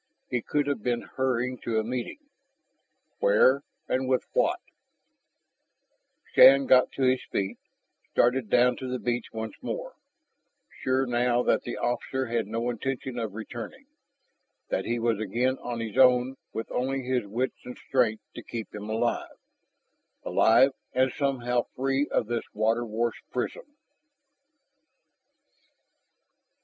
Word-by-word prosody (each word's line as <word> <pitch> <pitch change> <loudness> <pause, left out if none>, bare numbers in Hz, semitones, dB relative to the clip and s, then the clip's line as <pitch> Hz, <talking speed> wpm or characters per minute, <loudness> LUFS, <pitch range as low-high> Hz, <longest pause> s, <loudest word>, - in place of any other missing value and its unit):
He 125 -2 0
could 145 +5 0
have 140 -6 -2
been 120 +1 -1
hurrying 125 -1 0
to 115 -2 -2
a - - 0
meeting. 125 - -4 1.0
Where 140 - +4 0.3
and 130 0 0
with 130 -1 +2
what? - - +2 1.7
Shann 135 0 +8
got 130 -1 +5
to 135 - -2
his 130 0 +3
feet, 95 -1 -2 0.5
started 125 -2 +2
down 125 0 +4
to 130 - -5
the 125 - -1
beach 120 -1 -2
once 110 0 -5
more, - - -5 0.9
sure 130 +1 +1
now 120 0 +1
that - - +2
the 120 - -5
officer 130 +2 -1
had 115 -3 -1
no 115 +3 -1
intention 125 +1 -4
of 110 -3 -4
returning, 120 - -7 0.8
that - - -1
he 120 - -1
was 115 -2 0
again 120 +5 0
on 120 -1 -4
his 110 -2 -5
own 125 0 +5 0.2
with 115 - -5
only 135 +1 -1
his 125 -4 -1
wits 120 +6 -2
and 125 - -8
strength 120 -5 0
to - - -8
keep 115 -2 -7
him 105 0 -7
alive 115 +2 -1 0.9
alive 130 +5 +5 0.2
and 130 +1 +2
somehow 125 -3 0
free 135 +2 0
of - - +1
this 120 +1 -2
water 115 +2 +1
washed 115 +2 -3
prison. - - -4
125 Hz, 135 wpm, -27 LUFS, 115-130 Hz, 1.7 s, Shann